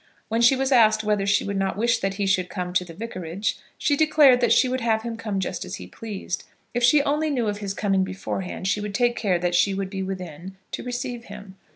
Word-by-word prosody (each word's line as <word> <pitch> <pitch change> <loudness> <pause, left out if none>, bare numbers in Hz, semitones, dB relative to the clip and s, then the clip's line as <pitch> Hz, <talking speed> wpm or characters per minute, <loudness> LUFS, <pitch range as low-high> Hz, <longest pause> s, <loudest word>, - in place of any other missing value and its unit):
When 225 +1 +1
she 235 +3 +6
was 265 +1 -1
asked 220 -4 +5
whether 210 -2 0
she 200 0 +3
would 200 0 -3
not 195 0 -1
wish 235 +2 +2
that 195 0 -2
he 200 0 -1
should 185 -2 +1
come 180 -1 -4
to 180 - +2
the 170 -2 -11
vicarage, 190 -3 -4 0.2
she 290 - +1
declared 290 -4 +5
that 240 - +3
she 260 - +5
would 255 0 -2
have 220 -1 +1
him 235 -1 -4
come 215 -3 -3
just 185 -1 -3
as - - -6
he 90 - -9
pleased. 195 - -6 0.3
If 240 - -1
she 280 +4 +5
only 300 +2 0
knew 250 -6 0
of 205 0 -2
his 200 -1 -4
coming 195 -2 +1
beforehand 190 0 -4
she 205 +1 +1
would 205 -1 -5
take 240 +2 +2
care 195 -5 +1
that 175 0 -1
she 195 +2 +3
would 195 -1 -3
be 195 -1 -3
within 185 -1 -6
to - - -4
receive 245 -1 -4
him. 205 -1 -11
205 Hz, 245 wpm, -24 LUFS, 190-240 Hz, 0.3 s, she